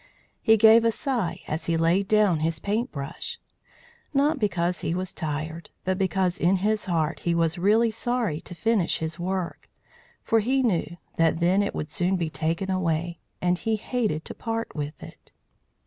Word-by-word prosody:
He 220 0 +5
gave 225 +1 +7
a 230 - +4
sigh 235 - -2
as 160 +2 -3
he 165 -1 +2
laid 170 +4 +2
down 210 -6 +3
his 160 +1 0
paintbrush; 200 - -3 0.8
not 285 +2 +3
because 180 -4 0
he 165 - -1
was 185 0 -3
tired, 160 +1 -4 0.2
but 185 +1 0
because 190 -1 0
in 180 +3 +3
his 210 +3 0
heart 165 -4 0
he 170 -1 0
was 165 0 +1
really 220 +5 +4
sorry 225 -8 -1
to 175 - -9
finish 220 -2 +1
his 160 +1 -4
work, 185 -1 -3 0.5
for 225 - +3
he 260 +5 +1
knew 175 -6 0 0.2
that 165 0 +3
then 180 +4 +3
it 200 - -2
would 150 - -4
soon 185 +1 +1
be 165 -3 -2
taken 170 +6 -1
away, 170 -2 -1 0.2
and 180 0 +2
he 225 -1 0
hated 215 -7 -2
to - - -6
part 225 0 -4
with 150 0 -5
it. - - -13
185 Hz, 175 wpm, -26 LUFS, 165-215 Hz, 0.8 s, gave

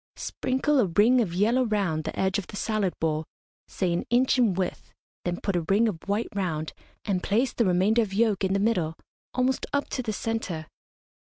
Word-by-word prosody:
Sprinkle 265 +3 0
a 220 - +3
ring 220 +9 +4
of 200 -7 -1
yellow 220 +8 +2
round 195 -9 0
the - - -4
edge 190 +1 +1
of 190 - -7
the - - -9
salad 210 -3 -1
bowl, 155 -1 0 0.4
say 180 -3 -1
an 170 - -1
inch 255 +2 +3
in 220 -7 +3
width, 185 -1 -3 0.3
then 175 0 -1
put 200 - -1
a 175 - 0
ring 210 +4 +4
of 190 -7 -3
white 205 +3 0
round, 165 -6 -2 0.3
and 190 -4 0
place 235 +7 +1
the 235 - +1
remainder 190 +5 +3
of 215 -4 -2
yolk 210 -1 +1
in 190 0 +1
the 200 - +2
middle, 185 -7 +1 0.4
almost 255 +1 +1
up 285 0 0
to 255 - -2
the 225 -3 -3
centre. 210 -7 -3
205 Hz, 200 wpm, -26 LUFS, 180-230 Hz, 0.4 s, ring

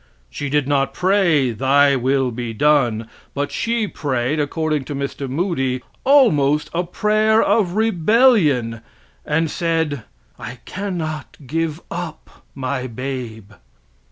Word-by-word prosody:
She 140 - -4
did 145 -1 +1
not 135 -1 0
pray 180 -9 +2
"Thy 140 +4 +3
will 130 0 +1
be 120 -1 -5
done," 120 -5 +2 0.3
but 145 0 -2
she 230 -2 -1
prayed, 140 -3 -2
according 155 0 -1
to 145 - -5
Mr. 140 0 -4
Moody, 135 -5 -1 0.2
almost 150 - +4
a 175 +1 0
prayer 215 +4 +2
of 200 -6 +2
rebellion, 190 - +3 0.5
and 160 +1 +1
said: 160 -6 -1 0.4
"I 125 +3 -7
cannot 170 -6 -5
give 165 +3 -2
up 170 -2 -7
my 130 -1 -3
babe." 120 -4 -6
145 Hz, 120 wpm, -20 LUFS, 130-175 Hz, 0.5 s, almost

